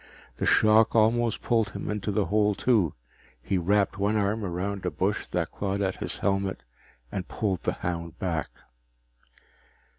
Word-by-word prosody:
The - - -1
shock 110 +1 +5
almost 115 +1 +2
pulled 115 -3 +1
him - - -5
into 105 0 -2
the 100 0 +1
hole 105 -1 +2
too. 105 - +2 0.4
He 95 -2 -1
wrapped 100 +3 +1
one 105 +2 +2
arm 105 +2 0
around 95 +2 -3
a 90 - 0
bush 100 +4 -1
that 85 -1 -2
clawed 100 0 -2
at 95 -2 -1
his - - -3
helmet 95 -1 -1 0.5
and 95 -2 -4
pulled 95 -5 -2
the - - -1
hound 85 -1 -3
back. 85 -4 -2
100 Hz, 155 wpm, -27 LUFS, 90-110 Hz, 0.5 s, shock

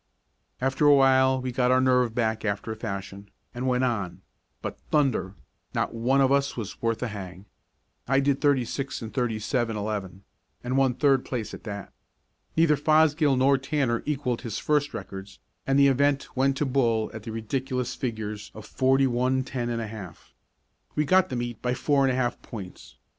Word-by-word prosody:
After 135 +3 +2
a 145 - +8
while 130 -1 +4
we 130 0 -3
got 125 0 +1
our 130 0 +5
nerve 125 -3 +2
back 110 -2 0
after 100 +1 -2
a - - -4
fashion, 100 -2 -6 0.2
and 125 +2 -3
went 125 0 +2
on, 100 -8 -2 0.4
but, - - -5
thunder! 130 -10 +1 0.4
not - - 0
one 125 +4 +2
of 135 0 +3
us 140 -1 +1
was 110 -4 -6
worth 115 +1 -1
a 125 - -1
hang. 95 -2 -8 0.6
I 135 +2 +3
did 140 0 +1
thirty 140 -4 +3
six 135 +1 -4
and 110 - -7
thirty 120 -4 0
seven, 115 0 -1
eleven, 100 -3 -4 0.4
and 125 +1 -2
won 135 -2 +3
third 135 -2 +3
place 120 -5 -4
at - - -10
that. 100 -3 -7 0.6
Neither 160 -2 +4
Fosgill 155 -1 +3
nor 135 +1 +4
Tanner 130 -3 0
equaled 135 -5 -1
his 115 -4 -4
first 145 -1 +1
records 95 0 -8 0.3
and 135 0 +3
the 140 0 +6
event 140 +1 +1
went 135 +1 +2
to 150 - 0
Bull 120 -5 +1
at 110 - -7
the 110 +1 -7
ridiculous 125 +3 -2
figures 110 -4 -4
of 110 -1 -9
forty 135 +3 +2
one, 130 +1 +1
ten 125 -2 -3
and 115 -1 -2
a - - -3
half. 105 -6 -10 0.6
We 150 - +1
got 185 +5 +4
the 130 - -3
meet 120 -2 -4
by 125 0 0
four 140 +1 +2
and 135 - +2
a - - -1
half 120 -2 -1
points. 95 -6 -10
125 Hz, 190 wpm, -26 LUFS, 110-135 Hz, 0.6 s, a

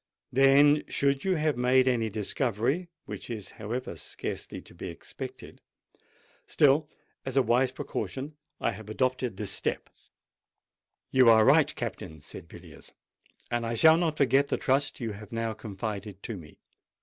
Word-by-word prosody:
Then, 140 +3 +6
should 140 -1 +1
you 190 -1 +2
have 155 -2 +1
made 125 +1 +3
any 115 -3 +1
discovery—which 130 - -2
is 110 -4 -6
however 115 -1 -4
scarcely 75 - -6
to - - -14
be - - -7
expected—still, 150 +2 -3 0.3
as 135 0 -3
a 135 - +6
wise 125 +2 +2
precaution, 135 +2 -5 0.2
I - - +1
have 110 0 -10
adopted 130 -2 -1
this 100 -2 -3
step——" - - -3 1.2
"You 130 -3 +6
are 110 -1 +7
right, - - +5
Captain," 80 0 -5
said 75 - -11
Villiers; - - -13 0.6
"and 120 -1 0
I 115 0 -2
shall 160 +6 +7
not 165 -3 0
forget 140 +1 +3
the - - 0
trust 135 +1 +1
you 115 -3 -3
have 105 0 -10
now 115 -1 -2
confided 105 -2 -6
to 115 - -4
me. 80 -5 -12
125 Hz, 145 wpm, -28 LUFS, 110-140 Hz, 1.2 s, are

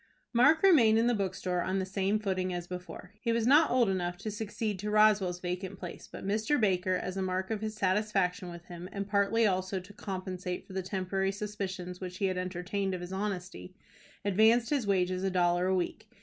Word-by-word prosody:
Mark 295 +8 +5
remained 245 - +6
in 225 - +3
the 240 - +3
bookstore 185 -3 -1
on 185 +2 -1
the 190 - 0
same 195 +2 0
footing 185 -3 -1
as 175 -1 -4
before. 180 +1 -8
He 230 - 0
was 230 -1 +1
not 295 +5 +6
old 245 -2 +3
enough 175 -2 -1
to 210 +3 -5
succeed 210 -1 -3
to 210 +2 -3
Rowell's 210 -4 +4
vacant 185 +2 -4
place, 180 -2 -8
but - - -8
Mr. 220 +8 +1
Baker, 185 -3 +2
as 185 +1 -3
a - - -1
mark 185 +1 -2
of 215 -2 -2
his 220 0 -3
satisfaction 190 -2 0
with 170 0 -10
him, 175 +1 -8
and 200 -1 -4
partly 205 +3 +2
also 185 -1 0
to 185 +3 -13
compensate 185 -2 -5
for 190 - -12
the 190 - -1
temporary 190 +1 -1
suspicions 195 -3 -5
which 180 -1 -6
he 195 - 0
had 185 -1 0
entertained 185 +2 -2
of 180 - -6
his 175 +1 -6
honesty, 190 -2 -4 0.5
advanced 220 +5 +4
his 275 -8 +1
wages 185 -1 +1
a 195 - +2
dollar 175 0 +2
a 190 - +2
week. 210 +4 -3
190 Hz, 205 wpm, -30 LUFS, 185-210 Hz, 0.5 s, remained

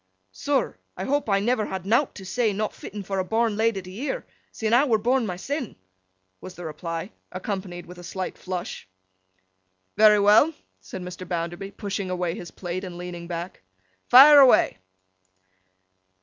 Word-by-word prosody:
'Sir, 280 - -1 0.2
I - - -4
hope 285 -3 -1
I 195 -1 +3
never 220 +1 0
had 190 -1 -5
nowt 235 +7 +2
to 195 - -9
say, 220 +2 0
not 210 +2 -2
fitten 205 0 -8
for 195 0 -3
a - - +1
born 225 +2 0
lady 220 -3 0
to 185 - -10
year, 285 - -4 0.3
sin' 220 0 -2
I 250 +4 +6
were 240 -7 +3
born 245 +2 +1
mysen',' 245 - -4 0.7
was 185 - -9
the 175 - -8
reply, 165 +4 -5 0.2
accompanied 185 -2 -5
with 180 +1 -12
a - - -10
slight 185 +1 -5
flush. 180 - -6 1.1
'Very 210 0 +7
well,' 210 +10 +5 0.3
said 185 - -8
Mr. 180 0 -8
Bounderby, 175 +3 -4
pushing 200 -1 -4
away 180 -2 -1
his 175 -3 -8
plate, 180 +1 -5
and 180 -2 -7
leaning 175 -1 -7
back. 170 +1 -6 0.5
'Fire 285 +4 +10
away! 260 - +5
195 Hz, 165 wpm, -25 LUFS, 180-225 Hz, 1.1 s, Fire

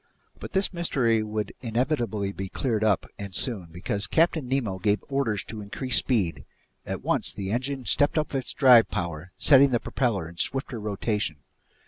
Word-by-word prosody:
But - - -8
this 190 0 +1
mystery 130 -10 +1
would 105 0 -3
inevitably 115 -4 -1
be 95 -1 -6
cleared 110 -2 -1
up, 105 -2 +2
and 100 -3 -6
soon, 95 +3 0
because 100 +3 -2
Captain 160 - +2
Nemo 115 -8 -1
gave 105 +2 +1
orders 130 -7 0
to 110 -1 -8
increase 120 +4 -1
speed; 100 -10 0 0.4
at - - -4
once - - 0
the 95 -1 -5
engine 130 +2 -2
stepped 145 +8 +2
up 155 -1 -1
its 130 -2 -2
drive 125 -5 +6
power, 85 -2 -4
setting 140 +3 +6
the 120 -2 +1
propeller 110 - -1
in 85 +1 -13
swifter 130 +3 -1
rotation. 105 -7 -2
110 Hz, 165 wpm, -26 LUFS, 100-135 Hz, 0.4 s, drive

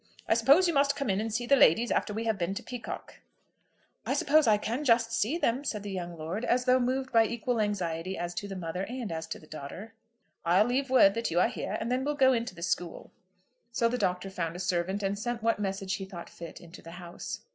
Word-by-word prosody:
I - - +4
suppose 275 +11 +5
you 340 - +1
must 280 0 +3
come 275 -8 -1
in 190 +2 0
and 225 0 -3
see 240 +3 -1
the 275 - +5
ladies 235 - +5
after - - 0
we 220 +2 -3
have 220 -3 -1
been 180 +3 -1
to - - -5
Peacocke?" 245 -3 -7 0.8
"I - - -1
suppose 305 -2 +4
I 215 -1 +5
can 235 +7 -3
just 230 -3 +3
see 230 +7 0
them," 260 -4 0
said 215 -7 -3
the 205 - -5
young 175 -2 -5
lord, 165 +8 -4
as 250 0 +1
though 255 0 +4
moved 260 +1 -1
by 225 -2 +5
equal 235 0 -1
anxiety 185 -3 -2
as 175 0 -3
to 205 - -4
the 195 - -6
mother 180 0 -4
and 245 -5 -5
as 160 0 -4
to - - -5
the - - -16
daughter. 155 +9 -8 0.5
"I'll 180 +5 +4
leave 260 +3 0
word 225 -7 +6
that 230 +2 -2
you 170 +1 +1
are - - +4
here, - - -4
and 230 - -3
then 255 +1 +1
we'll 295 +1 -1
go 265 -2 +5
into 230 -4 -2
the 170 - -8
school." 175 -1 -3 0.6
So 230 0 +2
the 245 +1 -1
Doctor 180 0 -1
found 170 -3 -3
a - - -6
servant, 185 +2 -1
and 200 +1 -1
sent 240 0 -3
what 230 -2 +2
message 195 -1 -2
he 195 0 -3
thought 180 -3 -9
fit 170 -1 -9
into 170 +1 -13
the 165 - -11
house. 175 -1 -7
215 Hz, 245 wpm, -29 LUFS, 180-245 Hz, 0.8 s, word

